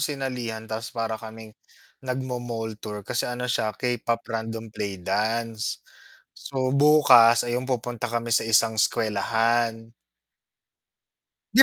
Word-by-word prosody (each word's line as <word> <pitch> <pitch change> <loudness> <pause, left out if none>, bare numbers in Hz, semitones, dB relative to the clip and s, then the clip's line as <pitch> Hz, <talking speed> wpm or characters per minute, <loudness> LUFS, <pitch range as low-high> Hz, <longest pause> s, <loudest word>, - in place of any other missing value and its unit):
sinalihan 125 -6 -3
tapos 110 0 -5
para 115 -1 -2
kaming, 110 -1 -10 0.5
nagma-mall 120 -4 -4
tour, 105 -1 -6
kasi 120 +5 -2
ano 125 0 -3
siya 110 -2 0
K-pop 120 -1 -1
random 115 0 -4
play 100 -3 -4
dance. 110 +4 -1 0.6
So 130 -2 -2
bukas, 140 -5 +6
ayun 120 +1 -2
yung - - -9
pupunta 120 -2 -2
kami 120 0 -2
sa 115 - +3
isang 110 0 +3
eskuwelahan. 115 +2 +1 1.6
Di - - +10
115 Hz, 120 wpm, -25 LUFS, 110-125 Hz, 1.6 s, Di